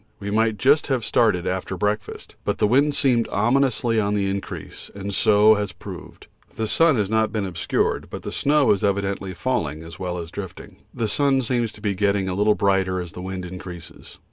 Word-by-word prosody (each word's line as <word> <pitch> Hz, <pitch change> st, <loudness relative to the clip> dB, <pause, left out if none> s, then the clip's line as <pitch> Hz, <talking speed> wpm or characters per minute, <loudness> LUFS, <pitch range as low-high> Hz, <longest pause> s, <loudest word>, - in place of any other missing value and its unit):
We 100 Hz, 0 st, -5 dB
might 110 Hz, 0 st, +2 dB
just 140 Hz, +8 st, +3 dB
have 130 Hz, -6 st, 0 dB
started 90 Hz, -7 st, +2 dB
after 95 Hz, 0 st, -3 dB
breakfast, 105 Hz, +3 st, -3 dB
but -, -, -1 dB
the -, -, +2 dB
wind 140 Hz, +7 st, +3 dB
seemed 125 Hz, -6 st, +2 dB
obviously 120 Hz, 0 st, +2 dB
on 105 Hz, -1 st, 0 dB
the 100 Hz, -1 st, 0 dB
increase, 100 Hz, 0 st, -6 dB
and 100 Hz, 0 st, -5 dB
so 105 Hz, +2 st, +5 dB
has 105 Hz, -1 st, -2 dB
proved. -, -, -10 dB, 0.3 s
The 110 Hz, -, -2 dB
sun 165 Hz, +5 st, +4 dB
has 105 Hz, -4 st, 0 dB
not 110 Hz, +1 st, +1 dB
been 105 Hz, -3 st, -2 dB
obscured, 85 Hz, -2 st, -1 dB
but -, -, -7 dB
snow 145 Hz, 0 st, +3 dB
is 100 Hz, -, +1 dB
evidently 100 Hz, -2 st, -1 dB
falling 80 Hz, -, -2 dB
as 80 Hz, 0 st, -11 dB
well 90 Hz, -1 st, -3 dB
as 85 Hz, -1 st, -6 dB
drifting. 95 Hz, -2 st, -8 dB
The 115 Hz, -, -2 dB
sun 135 Hz, +4 st, +2 dB
seems 120 Hz, -2 st, 0 dB
to -, -, -11 dB
be 100 Hz, -2 st, 0 dB
getting 100 Hz, 0 st, +1 dB
a 95 Hz, -, -1 dB
little 105 Hz, +2 st, +3 dB
brighter 95 Hz, -2 st, +1 dB
as 90 Hz, -2 st, -6 dB
the 90 Hz, -, -8 dB
wind 95 Hz, 0 st, -5 dB
increases. 90 Hz, -2 st, -10 dB
105 Hz, 195 wpm, -23 LUFS, 95-115 Hz, 0.3 s, so